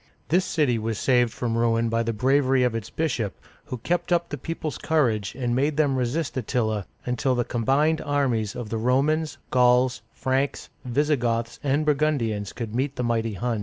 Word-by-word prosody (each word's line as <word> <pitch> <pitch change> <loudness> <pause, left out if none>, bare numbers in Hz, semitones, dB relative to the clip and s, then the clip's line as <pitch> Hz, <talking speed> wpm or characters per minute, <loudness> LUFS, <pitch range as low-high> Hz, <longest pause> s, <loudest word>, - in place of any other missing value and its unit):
This 180 +4 +3
city 140 -8 +1
was 110 0 -2
saved 125 -2 +3
from 115 -1 -2
ruin 115 0 +2
by 115 0 +1
the 115 0 -1
bravery 130 +3 +2
of 125 -2 +1
its 115 -3 -4
bishop, 125 - -2 0.3
who 125 - -5
kept 175 +10 -2
up 170 -1 +2
the - - -4
people's 165 -2 -4
courage 115 -11 +1
and 120 -2 -1
made 145 +3 +1
them 145 -3 +2
resist 130 +3 -1
Attila, 110 -5 -1 0.2
until 125 +2 0
the 120 - +1
combined 140 +7 +1
armies 130 -8 0
of 120 -3 -5
the 115 - -2
Romans, 145 +6 +1
Gauls, 125 -1 +3
Franks, 135 +2 -1
Visigoths, 120 -3 0
and 145 +2 +1
Burgundians 140 -9 0
could 115 -3 -6
meet 135 +3 -1
the 125 - -2
mighty 115 -2 0
Huns. 115 +2 -1
125 Hz, 175 wpm, -25 LUFS, 115-145 Hz, 0.3 s, This